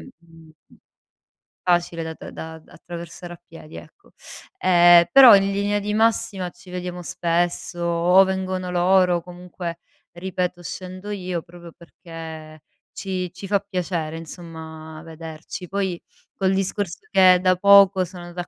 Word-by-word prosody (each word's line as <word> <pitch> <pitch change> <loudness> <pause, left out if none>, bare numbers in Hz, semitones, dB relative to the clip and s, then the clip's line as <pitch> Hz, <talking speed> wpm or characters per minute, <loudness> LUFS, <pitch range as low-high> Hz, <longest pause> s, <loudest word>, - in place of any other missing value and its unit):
mhmm 165 -9 -17 1.1
facile 175 -2 0
da - - -10
da 160 0 -8
attraversare 175 0 -10
a 170 - -18
piedi, 160 -1 -13
ecco. 400 - -15 0.5
Ehm, 175 - +6
però 260 -5 +10
in 195 0 +1
linea 205 +1 0
di 210 +1 -3
massima 215 -4 0
ci 180 +1 -17
vediamo 180 0 -6
spesso 175 +1 -2
o 170 +2 +4
vengono 185 -1 -3
loro 180 0 +3
o 170 - -4
comunque 175 -1 -8 0.3
ripeto 180 0 -4
scendo 185 +3 -8
io 180 -4 -4
proprio 175 -1 -14
perché 160 -3 -11 0.3
ci 185 -2 -4
ci 185 +2 -9
fa 200 0 +1
piacere 175 -5 -4
insomma 160 -1 -10
vederci. 160 +2 -9
Poi 190 -2 -3 0.3
col 190 -1 0
discorso 195 -1 -2
che 185 -2 +6
da 185 0 +3
poco 200 0 +6
sono 180 0 -11
andata 175 +1 -7
180 Hz, 135 wpm, -22 LUFS, 170-190 Hz, 1.1 s, però